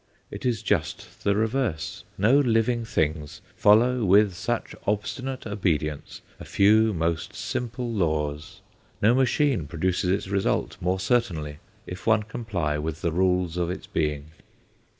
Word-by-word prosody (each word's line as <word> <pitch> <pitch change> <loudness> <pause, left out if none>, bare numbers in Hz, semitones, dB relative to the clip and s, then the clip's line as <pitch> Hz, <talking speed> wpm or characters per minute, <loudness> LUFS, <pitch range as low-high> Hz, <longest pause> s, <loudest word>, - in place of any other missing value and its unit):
It - - -4
is 115 -3 -1
just 90 -9 -2
the 100 0 +2
reverse. 110 - -2
No 115 +8 +4
living 120 -2 +2
things 75 -7 -2 0.2
follow 120 +4 +4
with 100 0 +4
such 90 - -3
obstinate 125 +6 -2
obedience 80 -8 -2 0.2
a - - -8
few 110 +2 +4
most 85 -2 -2
simple 125 0 -4
laws; 75 -5 -2 0.4
no 110 +3 +4
machine 130 - +2
produces 90 +3 -1
its 95 +1 0
result 100 0 0
more 90 +2 0
certainly, 85 -9 -1 0.3
if 90 +3 -8
one 110 -1 +4
comply 100 -9 -3
with 80 +1 -5
the 85 - +1
rules 90 0 +1
of 85 -1 0
its 90 - -5
being. 75 -1 -2
95 Hz, 135 wpm, -25 LUFS, 80-110 Hz, 0.4 s, No